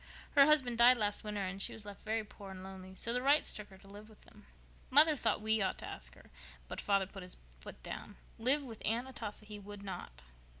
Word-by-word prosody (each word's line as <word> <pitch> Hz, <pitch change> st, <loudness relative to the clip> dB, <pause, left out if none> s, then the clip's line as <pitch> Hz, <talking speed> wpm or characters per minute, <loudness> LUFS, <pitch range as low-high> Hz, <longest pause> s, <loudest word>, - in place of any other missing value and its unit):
Her 280 Hz, -1 st, +7 dB
husband 260 Hz, -6 st, +3 dB
died 245 Hz, +1 st, +8 dB
last 205 Hz, -2 st, -1 dB
winter 210 Hz, -2 st, -3 dB
and 195 Hz, +1 st, -4 dB
she -, -, 0 dB
was 220 Hz, -, -9 dB
left 205 Hz, -1 st, -9 dB
very 220 Hz, 0 st, -1 dB
poor 205 Hz, -1 st, -12 dB
and 190 Hz, -1 st, -8 dB
lonely, 190 Hz, 0 st, -10 dB
so 230 Hz, +4 st, -1 dB
the 250 Hz, -, 0 dB
Wrights 285 Hz, +3 st, +4 dB
took 210 Hz, -1 st, -7 dB
her 190 Hz, -, -14 dB
to 195 Hz, -, -18 dB
live 205 Hz, +2 st, -12 dB
with 215 Hz, -, -18 dB
them. -, -, -19 dB, 0.4 s
Mother 300 Hz, +3 st, +7 dB
thought 255 Hz, -, 0 dB
we 220 Hz, 0 st, +2 dB
ought 190 Hz, -, 0 dB
to -, -, -7 dB
take -, -, -6 dB
her, -, -, -18 dB, 0.4 s
but -, -, -5 dB
father 200 Hz, -1 st, +2 dB
put 195 Hz, +1 st, -10 dB
his 180 Hz, 0 st, -5 dB, 0.2 s
foot 65 Hz, -, -11 dB
down. -, -, -7 dB, 0.2 s
Live 270 Hz, +6 st, +5 dB
with 230 Hz, -5 st, -9 dB
Aunt 235 Hz, +4 st, 0 dB
Atossa 215 Hz, -5 st, -4 dB
he 210 Hz, -1 st, -8 dB
would 205 Hz, 0 st, -9 dB
not." 175 Hz, -, -7 dB
210 Hz, 240 wpm, -34 LUFS, 195-240 Hz, 0.4 s, died